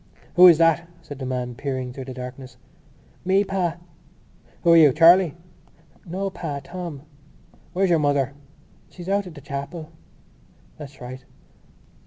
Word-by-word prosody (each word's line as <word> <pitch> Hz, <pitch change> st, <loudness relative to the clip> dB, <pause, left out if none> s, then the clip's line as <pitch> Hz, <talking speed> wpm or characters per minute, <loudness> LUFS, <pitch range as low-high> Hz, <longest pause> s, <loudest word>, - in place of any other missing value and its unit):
"Who 180 Hz, 0 st, +9 dB
is 170 Hz, -3 st, +7 dB
that?" 165 Hz, 0 st, +3 dB, 0.2 s
said 145 Hz, -3 st, -9 dB
the 130 Hz, -, -4 dB
man, 125 Hz, -1 st, -3 dB
peering 130 Hz, -1 st, -4 dB
through 130 Hz, 0 st, -7 dB
the 130 Hz, -, -7 dB
darkness. 125 Hz, 0 st, -9 dB, 0.7 s
"Me, 190 Hz, +2 st, +3 dB
pa." 180 Hz, -4 st, -2 dB, 0.9 s
"Who 170 Hz, -, +5 dB
are -, -, +8 dB
you? 155 Hz, -4 st, +7 dB
Charlie?" 170 Hz, 0 st, +6 dB, 0.7 s
"No, 190 Hz, +3 st, -3 dB
pa. 145 Hz, -6 st, -5 dB
Tom." 170 Hz, -3 st, -7 dB, 0.7 s
"Where's 190 Hz, 0 st, +1 dB
your 165 Hz, -, +4 dB
mother?" 140 Hz, -2 st, +1 dB, 0.6 s
"She's 175 Hz, -1 st, -11 dB
out 200 Hz, -1 st, 0 dB
at 170 Hz, -, -11 dB
the 145 Hz, -, -11 dB
chapel." 145 Hz, +4 st, -6 dB, 0.8 s
"That's 145 Hz, -2 st, -12 dB
right.... 130 Hz, +1 st, -8 dB
155 Hz, 145 wpm, -23 LUFS, 135-175 Hz, 0.9 s, Who